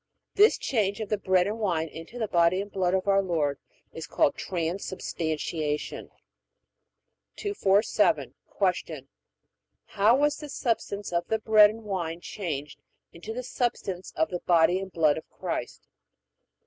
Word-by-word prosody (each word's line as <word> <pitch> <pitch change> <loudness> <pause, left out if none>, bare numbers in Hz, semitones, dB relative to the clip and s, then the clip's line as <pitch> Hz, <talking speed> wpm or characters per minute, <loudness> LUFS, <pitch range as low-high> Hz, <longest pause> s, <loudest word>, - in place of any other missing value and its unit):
This 425 +2 +5
change 205 -5 0
of 215 -2 -4
the 210 - +1
bread 185 -2 +3
and 210 +3 -3
wine 170 -7 0
into 165 +9 -10
the 220 -3 -1
body 170 0 +3
and 200 +1 -5
blood 185 -1 +1
of 190 +1 -1
our 195 0 +4
Lord 155 -7 -1 0.3
is 160 0 -7
called - - +2
Transubstantiation. 160 -3 -3 1.3
247. 210 - +1 0.5
Q. - - -9 0.8
How 210 +3 +3
was 290 +1 +2
the 300 - -8
substance 205 -7 -2
of 170 0 0
the 220 - +1
bread 215 -1 +6
and 225 +1 -8
wine 175 -5 -3
changed 150 -7 -5 0.3
into 170 +6 -8
the 250 +3 -4
substance 205 -7 -3
of 160 0 +1
the 180 - -2
body 170 +1 +3
and 190 0 -7
blood 155 -3 +2
of - - -18
Christ? - - -5
190 Hz, 145 wpm, -27 LUFS, 165-215 Hz, 1.3 s, bread